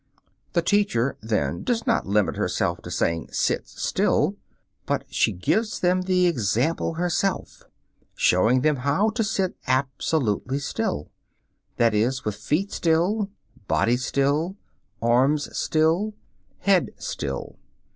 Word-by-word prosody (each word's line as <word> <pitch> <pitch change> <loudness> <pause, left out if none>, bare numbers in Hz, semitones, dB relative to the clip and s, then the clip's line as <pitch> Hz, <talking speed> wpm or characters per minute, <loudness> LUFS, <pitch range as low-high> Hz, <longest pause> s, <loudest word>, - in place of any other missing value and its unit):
The 170 - +2
teacher, 170 - +1
then, 110 0 -1
does 235 -2 -1
not 230 - +1
limit 105 0 +2
herself - - -1
to - - -9
saying, 85 -1 -1
"Sit - - 0
still," - - 0 0.5
but - - 0
she - - +3
gives 210 - 0
them 180 +1 +2
the 185 -1 +2
example 140 - 0
herself, 180 +3 -1 0.5
showing 110 +8 +3
them 150 +1 +2
how 145 +12 +1
to 225 +1 0
sit 195 -3 -1
absolutely 130 -1 0
still; 75 - -3 0.7
that 115 -2 +3
is, 120 +5 0
with 105 - -1
feet 155 - -1
still, 180 +6 +1 0.4
body 120 - +2
still, 140 +8 0 0.5
arms 130 +6 +2
still, 165 +7 +1 0.5
head 195 -3 +3
still. 70 -2 -5
150 Hz, 120 wpm, -24 LUFS, 120-185 Hz, 0.7 s, she